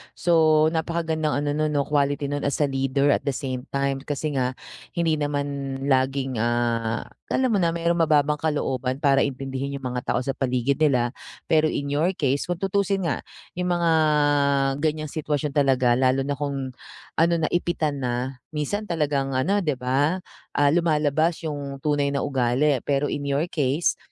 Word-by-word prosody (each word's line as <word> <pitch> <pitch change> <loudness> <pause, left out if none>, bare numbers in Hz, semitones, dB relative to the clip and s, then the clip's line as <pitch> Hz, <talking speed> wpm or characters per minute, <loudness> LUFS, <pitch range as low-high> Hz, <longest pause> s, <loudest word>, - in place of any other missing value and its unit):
So 160 -3 +4
napakagandang 160 -2 -1
ano 145 - 0
nun 150 0 0
'no, 140 - +2
quality 145 -1 0
nun 145 0 -1
as 145 +1 0
a 140 - 0
leader 135 +1 +1
at - - 0
the 135 - 0
same 130 0 -4
time, 140 0 -1
kasi 145 +2 -3
nga 125 0 -1 0.4
hindi 165 -3 +1
naman 140 -2 -2 0.2
laging, 130 -2 +1
ah, 115 -1 0 0.2
alam 260 -2 +1
mo 205 - +2
na 170 -1 +1
marong 170 0 0
mababang 150 -2 +3
kalooban 135 -3 -1
para 135 -1 +4
intindihin 135 0 -2
'yung 135 - -8
mga 125 0 -4
tao 125 - 0
sa 135 - -1
paligid 130 +1 0
nila, 125 -6 +2 0.4
pero 155 0 +5
in 140 -2 -3
your 170 +6 +1
case, 140 +2 0
kung 175 - -1
tutusin 195 +1 0
nga 155 -6 -1 0.4
yung 180 - 0
mga 170 -1 +2 0.9
ganyang 155 -1 -1
sitwasyon 150 -2 -2
talaga 130 -4 +3
lalo 130 +1 +2
na 145 - -3
kung 140 -2 -3 0.5
ano 170 +1 +4
na 160 -2 0
ipitan 160 -5 0
na 125 +1 -3 0.2
minsan 205 +8 -2
talagang 145 -5 -1
ano 195 +11 +2
di 150 -7 0
ba, 135 +7 +1 0.4
ah, 145 0 +4
lumalabas 160 0 +1
yung 140 -3 -4
tunay 145 -2 +1
na 140 - 0
ugali. 135 +1 +2
Pero 145 0 +1
in 145 -1 -3
your 140 +4 +1
case, 145 +2 +1
145 Hz, 170 wpm, -24 LUFS, 135-155 Hz, 0.9 s, pero